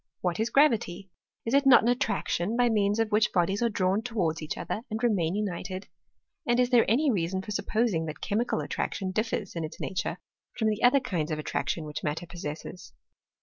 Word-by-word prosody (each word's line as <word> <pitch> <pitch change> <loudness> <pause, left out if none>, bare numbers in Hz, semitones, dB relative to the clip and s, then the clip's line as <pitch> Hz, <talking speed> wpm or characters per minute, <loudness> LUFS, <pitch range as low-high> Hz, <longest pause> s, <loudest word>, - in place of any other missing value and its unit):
What 180 +1 -1
is 225 +2 +1
gravity? 215 -10 +2 0.3
Is 230 - -2
it 280 0 +4
not 260 - +8
an - - +1
attraction 225 -3 0
by 245 -1 +4
means 205 -1 +2
of 225 -1 0
which 215 +1 +3
bodies 190 +3 +1
are 235 - +3
drawn 195 0 +1
towards 190 -10 -1
each 155 - -4
other, 215 - -3
and 220 +2 -4
remain 190 -7 +1
united? 190 -2 -4 0.6
And 240 +1 +3
is 250 0 +2
there 240 -2 +5
any 275 +6 +3
reason 190 -1 -1
for 210 - -7
supposing 210 -5 0
that 155 0 -6
chemical 220 +3 -1
attraction 190 -2 -3
differs 215 -2 -2
m 165 - -2
its 155 - -7
nature 190 - -3 0.4
from 220 -2 +2
the 215 0 -2
other 250 +3 +6
kinds 175 - -2
of 155 - -2
attraction 155 +1 -2
which 150 0 -6
matter 155 +3 -2
possesses? 170 0 -7
205 Hz, 195 wpm, -28 LUFS, 175-230 Hz, 0.6 s, not